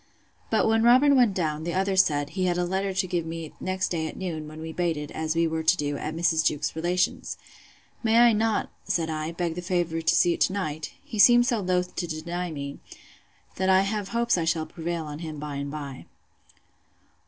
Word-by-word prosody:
But - - +2
when 225 0 +3
Robin 255 +5 +6
went 240 -7 +4
down, 155 -3 -1
the 170 +1 -3
other 195 +1 +1
said, 145 -6 +2
he 185 -1 -1
had 175 -1 +1
a 180 - +1
letter 190 +2 -1
to 190 0 0
give 175 -2 -1
me 165 -1 -6
next 185 0 -1
day 160 -2 -2
at - - -8
noon, 160 -5 -4
when 155 +1 -10
we 160 0 -6
baited, 160 -4 -2
as 160 0 -2
we 165 0 +3
were 160 0 -1
to 170 +3 +3
do, 145 -2 -2
at 155 +2 -4
Mrs. 165 -1 +2
Jewkes's 150 0 0
relation's.—May 180 +5 -2
I 240 -1 +7
not, 220 0 0
said 160 -2 -1
I, 155 +1 -3
beg 170 -1 -2
the 180 - -5
favour 175 -2 -1
to 170 +2 +2
see 175 - +4
it - - -7
to 185 - +3
night? 155 -6 -3
He 215 - -6
seemed 240 +2 +7
so 240 -3 +1
loath 180 -1 -1
to 175 - -2
deny 170 +3 -4
me, 140 -3 -6 0.8
that 190 0 +1
I 190 0 +6
have 200 0 -2
hopes 235 -4 +1
I - - 0
shall 160 -1 0
prevail 170 0 -4
on 150 0 -7
him 160 -2 -6
by 145 -1 -5
and 140 0 -4
by. 140 -3 -7
170 Hz, 215 wpm, -26 LUFS, 160-190 Hz, 0.8 s, I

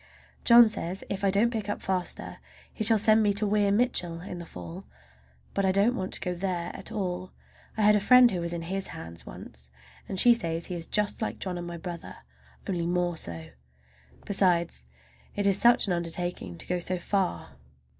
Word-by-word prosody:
John 235 -1 +8
says 190 -3 -4
if 195 0 -3
I 195 - +3
don't 205 +5 +2
pick 215 -2 -3
up 205 - -2
faster 185 -2 -3 0.3
he 220 - -3
shall 220 +1 +6
send 215 +1 +5
me 205 -2 +2
to 210 +1 +2
Weir 205 -1 +2
Mitchell 200 -7 0
in 180 -1 -7
the 170 - -8
fall. 85 - -9 0.7
But 195 - 0
I 190 - +3
don't 200 +6 +2
want 190 -5 -4
to - - +1
go 180 -1 -2
there 175 -1 -3
at - - -9
all. 185 -3 -4 0.4
I 215 - +1
had 210 0 +6
a - - +3
friend 250 +4 +6
who 180 - -2
was 170 0 -3
in 170 -1 -4
his 190 +3 -3
hands 85 0 -10
once, 65 +1 -10 0.4
and 190 - -3
she 240 +3 +7
says 165 -7 -3
he 180 - -5
is 165 -1 -5
just 210 +1 0
like 220 - -2
John 185 -2 -4
and 175 0 -5
my 170 0 -6
brother, 170 0 -7 0.5
only 170 -3 -1
more 175 0 0
so! 80 - -7 0.7
Besides, 175 - +1 0.5
it 205 - -1
is 200 0 +3
such 240 0 +5
an 190 - 0
undertaking 170 - -4
to - - -4
go 180 0 -1
so 180 +1 -1
far. 180 - -2
185 Hz, 205 wpm, -27 LUFS, 170-205 Hz, 0.7 s, John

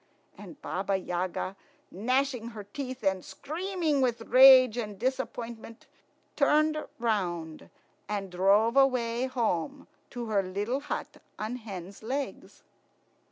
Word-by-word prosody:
And 295 - -12
Baba 195 +1 -1
Yaga, 185 +1 -3 0.4
gnashing 250 +3 0
her 210 - -6
teeth 255 +4 -7
and 190 -2 +1
screaming 330 -2 -2
with 240 -3 +1
rage 255 0 +8
and 210 -4 -4
disappointment, 235 -2 -4 0.5
turned 305 +2 +3 0.2
round 175 -9 -2 0.4
and 200 -3 -3
drove 200 +6 +3
away 255 -2 +2
home 245 - -2 0.2
to 240 -2 -5
her 210 -3 +1
little 205 +7 -2
hut 295 - -5 0.2
on 220 +4 -4
hen's 195 -4 -9
legs. 265 +5 -5
230 Hz, 115 wpm, -29 LUFS, 195-265 Hz, 0.5 s, rage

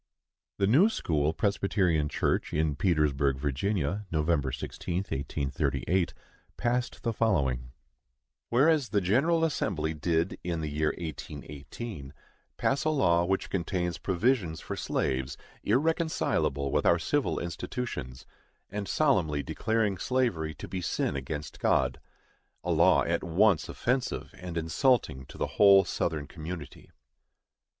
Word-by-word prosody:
The 100 - +2
New 145 - +5
school 80 - 0
Presbyterian 95 -5 +1
Church - - 0
in 75 -1 +1
Petersburgh, 70 -5 +2
Virginia, 90 +7 -1
Nov. 80 -1 -1 0.2
16, 85 - -5
1838, 80 +2 -1 0.4
passed 120 +1 -1
the 115 - 0
following: 70 - 0 0.8
Whereas, 140 +2 +3
the 105 - +2
General 140 - +2
Assembly 85 - 0
did, 80 +3 0
in 85 -2 -2
the 75 - -3
year 75 +1 0
1818, 75 - -7 0.4
pass 135 0 +1
a 155 - +2
law 85 - +3
which 95 +2 -1
contains 90 -2 -1
provisions 95 -3 +1
for - - -5
slaves 65 +1 -1 0.3
irreconcilable 130 - +1
with - - +1
our 85 - +5
civil 135 - 0
institutions, 85 - -5 0.5
and 100 0 -4
solemnly 90 - +2
declaring 110 -4 0
slavery 95 -12 0
to - - -8
be 95 - -4
sin 75 - -1
against 70 +2 -5
God—a 65 -1 -2
law - - +5
at - - -1
once 95 +1 +3
offensive 125 +1 -2
and 90 -2 -7
insulting 80 - +1
to - - -12
the - - 0 0.2
whole 100 -1 +8
Southern 80 -3 -2
community, 80 -1 -8
1. - - -27
85 Hz, 125 wpm, -29 LUFS, 75-110 Hz, 0.8 s, whole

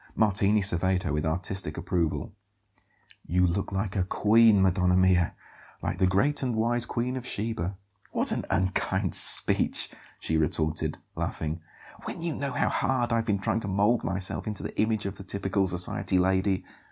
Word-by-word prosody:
Martini 105 -1 +3
surveyed 95 0 +1
her 80 - -2
with 75 +2 -1
artistic 85 -1 -2
approval. 85 -1 -2 0.9
"You 90 +2 +2
look 90 +4 -1
like 95 0 -2
a 95 - +2
queen, 110 +2 +4
Madonna 90 -1 +3
mia; 90 -2 +3 0.5
like - - -2
the 95 - +4
great 135 +11 +2
and 125 -3 -1
wise 120 +2 +1
Queen 125 +2 -2
of 130 - -4
Sheba." 105 -5 -3 0.3
"What - - +2
an - - -1
unkind 95 +1 0
speech!" - - +3 0.3
she 80 - -1
retorted, 80 -1 -1 0.2
laughing; 80 +1 -3 0.4
"when 170 - -6
you 170 -2 -1
know 140 -1 -3
how - - +1
hard 125 -3 0
I've 115 -1 +1
been 105 -3 +1
trying 100 +3 -1
to 110 - -6
mould 105 +5 +2
myself 95 +3 -3
into 105 -2 -4
the - - -6
image 110 -1 0
of 100 0 -4
the - - -9
typical 95 0 0
society 90 +1 -1
lady! 95 +1 +1
95 Hz, 165 wpm, -27 LUFS, 90-110 Hz, 0.9 s, queen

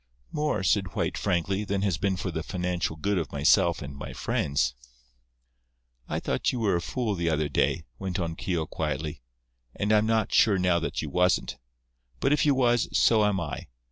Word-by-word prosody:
"More," 150 -9 -1
said 95 -3 +1
White, - - -1
frankly, 95 +3 0
"than 100 -1 -1
has 95 -6 0
been 100 -1 +1
for 90 0 -3
the 80 - -3
financial 90 -2 -2
good 100 +4 0
of 80 -5 -4
myself 75 +3 +3
and 70 0 -8
my 70 - -7
friends." 70 0 0 1.4
"I - - -1
thought - - 0
you 125 - -3
were 105 -5 +2
a 85 - 0
fool 115 +3 -2
the 85 -3 -1
other 75 -1 +1
day," 80 +2 0
went 95 -1 -3
on 85 -2 -2
Keogh, 85 -2 -2
quietly, 75 0 -3 0.5
"and 105 +1 -1
I'm 105 0 +4
not 110 -2 +1
sure 105 -4 +5
now 90 -2 +2
that 80 - -3
you 75 - -5
wasn't. 90 +4 +1 0.6
But 135 - +2
if 150 - +2
you 140 - +4
was, 120 -3 +2
so 110 -2 +5
am 105 -2 +2
I. 75 -6 -5
90 Hz, 190 wpm, -27 LUFS, 80-105 Hz, 1.4 s, sure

